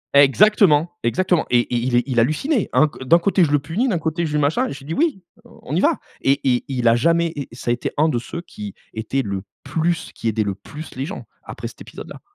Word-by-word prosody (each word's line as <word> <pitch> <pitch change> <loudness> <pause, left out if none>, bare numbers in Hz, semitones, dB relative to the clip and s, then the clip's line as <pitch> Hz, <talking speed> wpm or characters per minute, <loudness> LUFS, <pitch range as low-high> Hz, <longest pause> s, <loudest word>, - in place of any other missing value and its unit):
Exactement! 165 +2 +5
Exactement! 180 +7 +1
Et 120 -1 +4
et 120 - -4
il 120 +1 0
est, 120 - +4
il 125 -4 0
hallucinait. 195 - +1
Un 155 - +5
c 145 - -7
d'un 165 +6 +5
côté 185 +1 +2
je 145 - +1
le 145 - +5
punis, 165 - -1
d'un 190 -8 +1
côté 160 +1 -1
je 150 - -5
lui 150 - +2
machin. 160 - +1
Je 140 - -6
lui 135 - -14
dit: 160 - -4
«Oui! 290 - 0 0.2
On - - -8
y - - +2
va» - - +2 0.2
et 135 - +4
et, 125 -1 +2
il 125 -3 -1
a 115 - +6
jamais, 170 +5 +2
et 140 -2 -5
ça 120 0 -3
a - - +4
été 120 - -3
1 155 +2 +3
de 120 -5 0
ceux 170 +7 -7
qui 105 - -9 0.2
était 120 +5 -2
le 100 -2 -3 0.2
plus 170 +1 -1
qui - - -5
aidait 110 -1 +1
le 100 - -2
plus 145 +11 -10
les 135 +2 -3
gens 200 - -6 0.2
après - - -7
cet - - -13
épisode-là. - - -10
145 Hz, 255 wpm, -21 LUFS, 120-170 Hz, 0.2 s, a